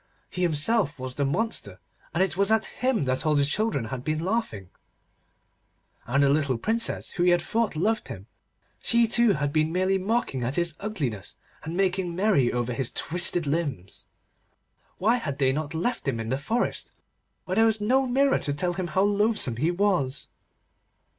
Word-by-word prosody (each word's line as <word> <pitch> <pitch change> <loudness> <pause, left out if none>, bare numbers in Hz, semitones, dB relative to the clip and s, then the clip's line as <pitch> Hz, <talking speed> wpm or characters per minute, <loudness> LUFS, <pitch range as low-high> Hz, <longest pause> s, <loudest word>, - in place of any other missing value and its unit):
He 180 - -4
himself 165 0 +2
was 130 -1 -5
the 140 +2 -1
monster, 220 +12 -2 0.3
and 175 - +2
it 180 -4 -2
was 200 +2 +2
at 220 0 +3
him 250 - -1
that 130 0 -1
all 155 -1 +2
the 145 -1 +3
children 160 - -1
had 125 -1 -5
been 155 +2 -1
laughing, 160 - -3 1.4
and 140 +4 +2
the 140 - +4
little 140 -3 +1
Princess 230 - 0
who 175 - -4
he 180 - +4
had 175 -1 +3
thought 225 -3 -1
loved 215 +8 0
him—she 230 - -3
too 235 -1 +3
had 145 -3 -2
been 155 0 +1
merely 185 +2 +1
mocking 195 - -1
at 125 +4 -2
his 170 -2 +1
ugliness, 145 - -4 0.3
and 165 +3 -5
making 185 -2 0
merry 185 - +2
over 120 0 -2
his 130 0 -1
twisted 175 0 +1
limbs. 140 - -3 0.9
Why 225 +6 +2
had 140 - -4
they 130 -2 +2
not 155 +2 -4
left 180 - -2
him 120 -4 -1
in 115 0 -4
the 130 +2 -1
forest, 230 +12 -2 0.5
where 185 +2 -3
there 225 0 +5
was 220 -1 +1
no 260 +6 +2
mirror 270 +2 +2
to 145 - -2
tell 175 +5 0
him 185 -1 -3
how 180 +4 +1
loathsome 205 - +1
he 155 +7 +1
was? 175 -8 0
170 Hz, 180 wpm, -26 LUFS, 140-210 Hz, 1.4 s, there